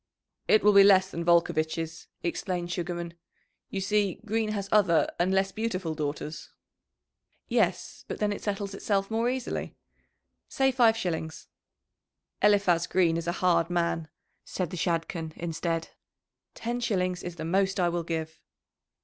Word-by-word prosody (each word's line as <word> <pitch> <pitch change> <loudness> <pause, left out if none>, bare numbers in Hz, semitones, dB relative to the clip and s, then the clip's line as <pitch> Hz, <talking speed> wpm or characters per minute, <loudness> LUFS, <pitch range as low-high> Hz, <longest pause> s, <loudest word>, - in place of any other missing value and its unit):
"It 215 - +5
will 210 0 +6
be 200 0 +9
less 190 -1 +5
than 170 - -4
Volcovitch's," 165 -1 +1 0.2
explained 175 0 -2
Sugarman. 175 -1 -4 0.6
"You 195 - -3
see, 200 -1 +1
Green 220 0 0
has 200 -2 -3
other 185 -6 +4
and 180 +2 +2
less 195 0 +2
beautiful 190 -6 -2
daughters." 150 0 -5 1.0
"Yes; - - 0
but - - -4
then 210 -1 0
it - - -7
settles 200 -1 -3
itself 195 0 -1
more 230 +2 +1
easily. 255 -1 -3 0.7
Say 270 0 +2
five 235 -3 +4
shillings." 160 -5 -4 0.9
"Eliphaz 200 -5 +3
Green 175 -3 +2
is 165 0 -3
a - - +2
hard 170 -2 +3
man," 170 -2 0 0.4
said 180 -3 -4
the - - -4
Shadchan 165 -2 -2
instead. 165 0 -3 0.7
"Ten 240 +1 -3
shillings 185 -6 -1
is 175 -1 -6
the 160 -1 -5
most 190 +3 +1
I 175 - +3
will 175 0 -1
give!" 160 -1 -4
180 Hz, 145 wpm, -28 LUFS, 170-200 Hz, 1.0 s, be